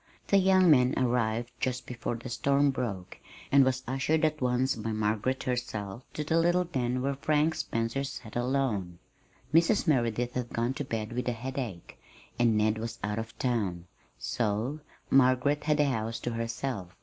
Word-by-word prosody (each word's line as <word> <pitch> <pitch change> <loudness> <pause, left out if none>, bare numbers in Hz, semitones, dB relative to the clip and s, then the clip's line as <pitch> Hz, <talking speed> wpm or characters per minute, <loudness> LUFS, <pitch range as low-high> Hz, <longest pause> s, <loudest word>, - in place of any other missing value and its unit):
The 200 - +5
young 185 -2 +5
man 125 -2 +4
arrived 120 -1 0
just 125 -1 -2
before 120 -1 -4
the 120 +2 -8
storm 140 +3 +2
broke, 105 -9 -4 0.3
and 140 0 +7
was 130 0 0
ushered 150 +5 +1
at 155 -1 -1
once 125 +1 +1
by 110 0 -4
Margaret 110 +4 0
herself 120 -3 -4
to 150 - -3
the 160 +2 +2
little 175 +2 +3
den 130 -6 -2
where 140 +1 0
Frank 150 +3 +1
Spencer 115 -3 -2
sat 130 -5 -7
alone. 120 -8 -1 0.6
Mrs. 170 +5 +4
Merideth 120 -4 +1
had 125 -2 -3
gone 120 +3 -1
to 145 +1 -4
bed 115 -4 -4
with 125 +1 -3
a 125 - +1
headache, 120 -6 -6 0.4
and 115 -2 +4
Ned 110 +1 +2
was 115 +1 -5
out 105 +1 -1
of 115 +1 -7
town, 100 -9 -1 0.3
so 115 +6 -1 0.3
Margaret 135 +3 +3
had 150 -1 +2
the 150 - +4
house 115 -4 -2
to 120 - -2
herself. 115 -4 -4
125 Hz, 170 wpm, -29 LUFS, 115-140 Hz, 0.6 s, and